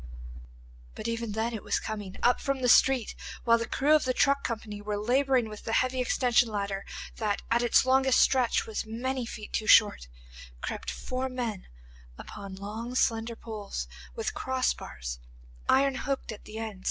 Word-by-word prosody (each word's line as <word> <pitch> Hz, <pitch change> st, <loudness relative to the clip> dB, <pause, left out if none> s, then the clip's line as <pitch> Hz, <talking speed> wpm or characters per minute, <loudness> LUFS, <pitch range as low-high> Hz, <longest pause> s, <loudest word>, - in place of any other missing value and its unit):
But -, -, -5 dB
even 230 Hz, -2 st, -2 dB
then 225 Hz, +2 st, -1 dB
it 220 Hz, -, -4 dB
was -, -, 0 dB
coming. 205 Hz, -3 st, -6 dB
Up 245 Hz, -, +4 dB
from 275 Hz, -2 st, -1 dB
the -, -, +3 dB
street, 250 Hz, -1 st, +5 dB, 0.3 s
while 230 Hz, -1 st, +4 dB
the 230 Hz, -, -3 dB
crew 290 Hz, +3 st, +2 dB
of 310 Hz, -, +5 dB
the 255 Hz, -1 st, 0 dB
truck 280 Hz, 0 st, +3 dB
company 215 Hz, -3 st, -4 dB
were 205 Hz, 0 st, -3 dB
labouring 255 Hz, +2 st, +2 dB
with 210 Hz, -1 st, -9 dB
the 225 Hz, -, -3 dB
heavy 255 Hz, +2 st, +2 dB
extension 245 Hz, -1 st, +3 dB
ladder 200 Hz, -2 st, -3 dB, 0.3 s
that 210 Hz, -3 st, -1 dB
at 235 Hz, +1 st, +4 dB
its 240 Hz, +1 st, +4 dB
longest 265 Hz, 0 st, +4 dB
stretch 255 Hz, -3 st, +3 dB
was 220 Hz, -, -3 dB
many 245 Hz, +3 st, -3 dB
feet 215 Hz, -2 st, -8 dB
too 215 Hz, -, -1 dB
short, 205 Hz, -, +6 dB, 0.5 s
crept -, -, -4 dB
four 255 Hz, -, -3 dB
men 240 Hz, -6 st, -4 dB, 0.5 s
upon 200 Hz, -2 st, -8 dB
long, 220 Hz, +5 st, -6 dB
slender 230 Hz, -1 st, +1 dB
poles 210 Hz, -, -6 dB, 0.3 s
with -, -, -2 dB
cross 260 Hz, -1 st, 0 dB
bars, -, -, -7 dB, 0.5 s
iron 275 Hz, +1 st, +4 dB
hooked 270 Hz, -1 st, -3 dB
at 215 Hz, -, -10 dB
the 215 Hz, +1 st, -8 dB
end. 220 Hz, -3 st, -5 dB
230 Hz, 175 wpm, -29 LUFS, 210-255 Hz, 0.5 s, short